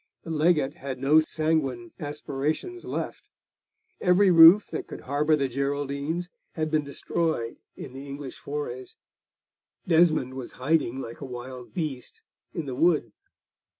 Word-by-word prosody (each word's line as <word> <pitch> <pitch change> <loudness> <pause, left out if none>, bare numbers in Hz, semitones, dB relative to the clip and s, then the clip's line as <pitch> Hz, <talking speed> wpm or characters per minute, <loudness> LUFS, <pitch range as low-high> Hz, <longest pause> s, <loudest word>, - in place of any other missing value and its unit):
The 165 - -6
Legate 155 -3 +2
had 135 -1 -5
no 140 +4 +5
sanguine 155 -7 -1
aspirations 150 - -3
left; - - -5 0.7
every 185 +1 +4
roof 170 +4 +9
that 160 - -4
could - - -8
harbour 150 +3 +2
the 140 -2 0
Geraldines 140 +5 -2 0.3
had 155 -1 -2
been 155 -1 +2
destroyed 140 -3 -2 0.2
in 130 - -9
the 135 +2 -8
English 140 -1 -7
forays; 140 -3 -5 0.9
Desmond 160 -6 +3
was 130 -2 -7
hiding, 135 -2 0
like 115 +2 -8
a - - -4
wild 125 +1 -8
beast, 150 -8 -5 0.3
in 165 - -4
the 135 - -4
Wood. 150 -4 +2
145 Hz, 135 wpm, -26 LUFS, 130-160 Hz, 0.9 s, roof